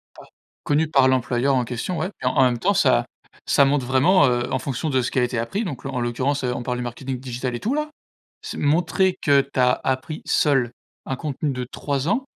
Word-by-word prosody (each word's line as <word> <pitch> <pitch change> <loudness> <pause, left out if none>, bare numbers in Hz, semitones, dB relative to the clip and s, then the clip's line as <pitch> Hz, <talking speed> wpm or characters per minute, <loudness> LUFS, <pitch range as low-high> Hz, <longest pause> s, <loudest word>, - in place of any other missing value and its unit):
Pa - - -13 0.4
connu 150 +2 +1
par 135 -4 +4
l'employeur 130 +1 +1
en 125 - +2
question 125 +9 -4
ouais 180 - -2
et - - -5
en 125 - +3
en - - +6
même 125 -2 +2
temps, - - +2
ça - - +3 0.4
ça 140 - +5
montre 135 -1 +1
vraiment, 140 +5 +4
heu, 120 -1 0
en 130 - +1
fonction 140 +4 -3
de 130 -2 +2
ce 125 - -2
qui - - -4
a - - +3
été 120 -1 -1
appris. 120 - -2
Donc 145 - -6
la 135 - -3
en 125 -2 -2
l'occurrence, 130 +4 -1
heu, 125 -1 0
on 120 - -5
parle 125 0 -2
du 125 - -3
marketing 125 +2 -5
digital 125 0 -4
et - - -4
tout 235 - -1
là. 300 +1 -1 0.5
C'est - - -6
montrer 175 +5 +2
que 140 -1 +5
tu 135 -1 -4
as 125 0 +5
appris 130 +4 -2
seule 135 -5 +2 0.4
un 135 - -2
contenu 145 +2 -3
de 125 -1 -4
3 140 0 -2
ans. 255 +7 +1
130 Hz, 240 wpm, -22 LUFS, 125-145 Hz, 0.5 s, en